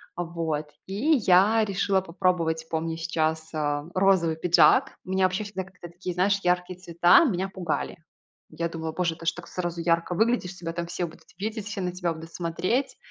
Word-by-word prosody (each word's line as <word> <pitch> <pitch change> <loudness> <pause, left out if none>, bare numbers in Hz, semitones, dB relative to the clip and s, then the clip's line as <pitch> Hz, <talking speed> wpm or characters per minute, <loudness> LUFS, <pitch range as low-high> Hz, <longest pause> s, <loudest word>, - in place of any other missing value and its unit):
А, 175 - -2
вот. 160 -3 -3 0.2
И 215 +12 +1
я 200 +5 +5
решила 195 -1 +1
попробовать, 165 -3 0
помню 160 0 -2
сейчас, 160 -1 -1
э, 145 -1 -1
розовый 185 -4 +3
пиджак. 180 - +4
Меня 190 0 +1
вообще 185 +3 0
всегда 200 -2 -5
как-то 180 -2 -12
такие, 175 +1 -6
знаешь, 195 +3 +2
яркие 180 0 0
цвета 175 - +5
меня 190 - -1
пугали. 180 -4 -3 0.5
Я 170 - -2
думала: 160 -1 -5
"Боже, 170 0 -1
ты 165 - -11
ж - - +5
так - - -10
сразу 175 -1 -4
ярко 170 +1 +1
выглядишь, 220 -3 +1
тебя 165 -2 -5
там 170 0 -4
все 175 - -2
будут 160 - -13
видеть, 215 +1 -4
все 210 -2 -4
на 180 -1 -1
тебя 175 -2 -2
будут 165 +1 -11
смотреть". 185 +10 -1
175 Hz, 185 wpm, -26 LUFS, 165-190 Hz, 0.5 s, я